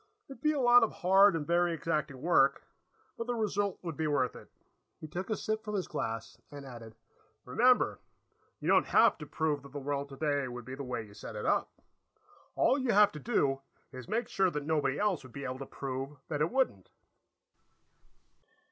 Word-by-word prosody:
It 275 - -8
would - - -20
be 305 - +3
a 290 - -1
lot 245 -1 +7
of 225 - +2
hard 195 +1 +5
and 155 -2 -2
very 175 +1 +2
exacting 150 -4 -2
work, 140 -5 +3 0.6
but 230 - -3
the 245 - -1
result 205 -3 -1
would 165 -3 -4
be 160 +1 -1
worth 135 -4 0
it." - - -12 0.5
He 155 - -8
took 180 +7 -5
a 220 - 0
sip 215 0 -2
from 210 -1 -4
his 190 - -2
glass 115 0 -4
and 145 -1 -9
added: 115 -4 -10 0.5
"Remember, 245 - +3 0.6
you - - -5
don't - - +4
have - - +4
to 150 - -8
prove 150 -1 -1
that 140 +1 -14
the - - -5
world 140 0 -3
today 140 -1 -1
would 125 -1 -7
be 130 - -7
the 135 - -6
way 125 -3 -4
you 100 - -16
set 100 - -9
it - - -5
up. - - +1 0.8
All 270 - +3
you 255 -3 +1
have 205 0 +6
to 150 - -8
do 140 - 0 0.3
is 130 +2 -9
make 225 +5 -1
sure 190 -1 +2
that 150 -4 -4
nobody 145 -3 0
else 205 -5 +1
would 130 -3 -14
be 140 - -7
able 130 +1 -4
to 135 - -7
prove 135 +1 -5
that 150 -1 -2
it 155 - +2
wouldn't." 250 - 0
150 Hz, 205 wpm, -31 LUFS, 135-205 Hz, 0.8 s, lot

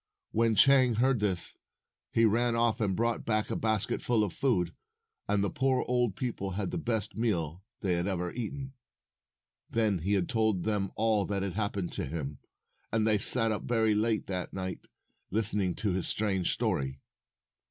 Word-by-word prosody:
When 115 0 +2
Chang 130 +1 +6
heard 125 +2 +2
this, 95 -4 -1 0.6
he 115 - +4
ran 115 +2 +2
off 115 -1 +1
and 100 -3 +1
brought 115 +2 0
back 110 -1 0
a - - -1
basket 110 -3 0
full 115 -3 +2
of 100 -5 -2
food, 90 -8 +1 0.5
and 100 -1 +2
the 100 - 0
poor 130 0 +1
old 120 -5 +1
people 100 -6 -3
had 100 +1 -2
the 175 - -2
best 115 - -2
meal 90 -7 -1 0.2
they 95 -3 +1
had 85 +2 0
ever 90 -2 -2
eaten. 135 +3 -5 1.0
Then 110 -5 +1
he 100 +5 +1
told 110 -2 0
them 105 -3 0
all 110 -2 +2
that 100 -1 -1
had 100 -3 -3
hap 105 +1 -1
pened 95 -3 -3
to - - -3
him, 75 -2 -5 0.5
and 110 -1 +1
they 110 -2 +3
sat 115 +2 +3
up 105 - -3
very 110 -2 +2
late 110 +1 +1
that 90 -2 -4
night 95 -1 -5 0.4
listening 100 -3 +1
to 105 - -1
his 90 0 -1
strange 95 -4 0
story. 65 0 -1
105 Hz, 175 wpm, -30 LUFS, 95-115 Hz, 1.0 s, Chang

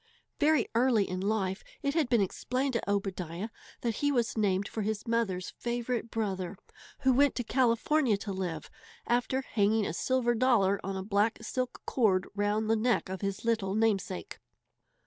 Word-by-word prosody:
Very 300 -4 +3
early 230 -3 +3
in 185 0 -3
life 195 -2 -1 0.2
it 280 - +1
had 310 -6 +1
been 235 -4 +4
explained 255 +7 -1
to 230 - -2
Obadiah 190 -1 -2 0.3
that 230 -3 -1
he 285 0 +1
was 240 -5 0
named 200 -2 +1
for 220 - -4
his 215 +1 -2
mother's 215 -6 0
favourite 240 0 -3
brother, 195 -4 -3 0.4
who 260 -1 +4
went 280 +2 +4
to 245 - -1
California 245 +1 +2
to 200 0 -5
live, 175 -4 -4 0.3
after 245 +2 +1
hanging 215 -3 +1
a - - -2
silver 245 +4 +1
dollar 220 -5 +3
on 195 0 -3
a 190 - -3
black 205 +2 +1
silk 255 -1 -3
cord 195 -7 +2
round 205 +1 0
the 225 - +3
neck 225 -2 +1
of 190 0 -5
his 195 +1 -3
little 210 -4 +1
namesake. 205 - -1
220 Hz, 165 wpm, -30 LUFS, 195-245 Hz, 0.4 s, been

